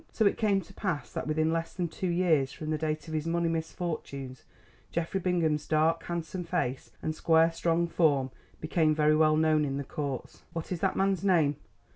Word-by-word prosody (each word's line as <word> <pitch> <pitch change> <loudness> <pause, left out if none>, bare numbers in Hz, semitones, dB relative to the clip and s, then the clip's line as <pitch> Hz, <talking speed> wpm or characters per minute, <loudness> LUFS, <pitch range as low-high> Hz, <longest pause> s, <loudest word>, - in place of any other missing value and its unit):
So 220 - +1
it 200 - +4
came 200 -3 +2
to 190 +2 -15
pass 170 -10 -3
that - - -3
within 155 +1 +1
less 165 0 -3
than 180 -2 -1
two 185 +3 -4
years 165 -6 +2
from 155 +2 -5
the 155 - +1
date 155 +1 -2
of 160 - -6
his 155 +1 -1
money 170 0 +1
misfortunes, 160 -5 -4 0.5
Geoffrey 170 +3 -1
Bingham's 165 -5 0
dark 160 +1 +2
handsome 170 +1 -4
face 165 -7 -2
and 155 - -1
square 165 +1 +4
strong 170 +1 +1
form 145 -6 +2 0.3
became 155 -1 +2
very 155 0 +4
well 155 0 +4
known 155 -1 +3
in 135 -1 -1
the 140 - -2
Courts. 140 -2 -5
"What 165 +1 -5
is 180 - -2
that 190 +1 +1
man's 195 -1 +1
name?" 160 -7 +3
160 Hz, 195 wpm, -29 LUFS, 155-170 Hz, 0.5 s, it